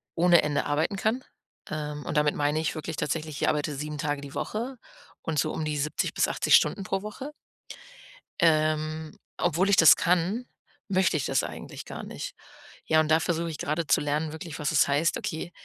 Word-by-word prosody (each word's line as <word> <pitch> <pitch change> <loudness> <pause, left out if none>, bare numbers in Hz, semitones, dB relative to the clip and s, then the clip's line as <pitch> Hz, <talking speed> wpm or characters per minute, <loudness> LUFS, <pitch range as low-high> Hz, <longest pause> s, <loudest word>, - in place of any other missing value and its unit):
ohne 175 0 +5
Ende 145 -1 0
arbeiten 155 +7 0
kann, 225 +6 0 0.5
ähm, 150 -1 -4
und - - -2
damit 150 0 +3
meine 150 +1 +1
ich 160 - -1
wirklich 155 0 -5
tatsächlich, 155 0 -3
ich - - +3
arbeite 150 0 -1
7 150 +2 -5
Tage 145 -1 -2
die 140 -1 -10
Woche 245 +5 -3 0.4
und 155 -2 -1
so - - +1
um 160 - -3
die 150 -1 -2
70 150 +1 -1
bis - - +2
80 - - +4
Stunden 200 - +3
pro 195 +1 -2
Woche 215 +8 -7 1.1
ähm, 155 -1 +1 0.2
obwohl 175 +3 +1
ich 200 - +6
das 165 - +9
kann, 180 +8 +1 0.4
möchte 190 -4 +2
ich 140 - -2
das - - +1
eigentlich - - -7
gar - - -7
nicht. - - -7 0.5
Ja, 160 - +4
und 155 -1 +1
da 160 +1 +5
versuche 170 0 -1
ich 155 - -6
grade 155 +2 -2
zu - - +3
lernen 150 +2 -1
wirklich, 160 0 -7
was 150 0 0
es 155 - +4
heißt 145 +4 +2
okay, 160 +2 -4
155 Hz, 195 wpm, -27 LUFS, 150-175 Hz, 1.1 s, das